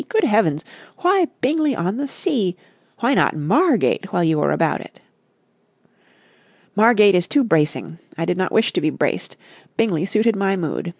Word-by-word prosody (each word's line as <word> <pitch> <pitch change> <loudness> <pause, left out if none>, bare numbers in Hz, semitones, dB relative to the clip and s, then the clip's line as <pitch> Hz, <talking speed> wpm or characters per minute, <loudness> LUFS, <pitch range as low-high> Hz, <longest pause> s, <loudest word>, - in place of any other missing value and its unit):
Good 445 -2 +1
heavens! 165 -8 +1 0.4
Why 365 -1 +3
Bingley 300 +1 +1
on 185 +4 -2
the 285 +1 -3
Sea? 235 - -2 0.5
Why 240 +4 +2
not - - +2
Margate 205 - +1
while 175 - 0
you 160 -2 +1
were - - +1
about - - 0
it?" - - -15 1.8
"Margate 210 -2 +5
is 180 -1 +1
too 290 -2 +2
bracing. 160 - -1 0.2
I 165 - -2
did 180 - -1
not 185 0 -2
wish 220 - +1
to - - -1
be - - +1
braced. - - -3 0.4
Bingley 185 -6 0
suited 220 +2 +1
my 195 0 0
mood. 175 -1 -4
205 Hz, 165 wpm, -20 LUFS, 170-255 Hz, 1.8 s, Margate